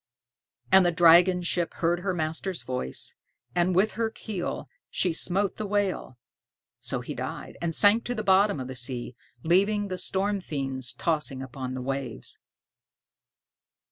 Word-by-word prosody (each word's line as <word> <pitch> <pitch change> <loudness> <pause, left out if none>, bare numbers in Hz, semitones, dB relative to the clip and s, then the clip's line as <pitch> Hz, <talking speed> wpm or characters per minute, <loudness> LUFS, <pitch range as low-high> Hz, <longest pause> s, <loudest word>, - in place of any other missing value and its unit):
And 190 0 +8
the 175 - +3
dragon 175 +2 +6
ship 175 0 -1
heard 170 +1 +1
her 190 +2 -1
master's 165 +2 -2
voice, 125 - -2 0.4
and 175 0 +2
with 200 +4 +3
her 225 0 -1
keel 210 -5 -5 0.2
she 180 -2 0
smote 190 +4 +1
the 215 - -3
whale; 200 -10 -1 0.6
so - - -3
he - - -6
died, - - -6
and 165 -2 0
sank 210 +3 +5
to 245 - -2
the 215 - -3
bottom 195 -3 +4
of 130 - -5
the 130 - -6
sea, 125 -1 -4 0.3
leaving 200 +4 +2
the 185 -1 -3
storm 200 +1 0
fiends 135 -6 -3
tossing 150 -5 -1
upon 130 0 -6
the 130 - -4
waves. 135 -3 -4
175 Hz, 150 wpm, -27 LUFS, 135-195 Hz, 0.6 s, And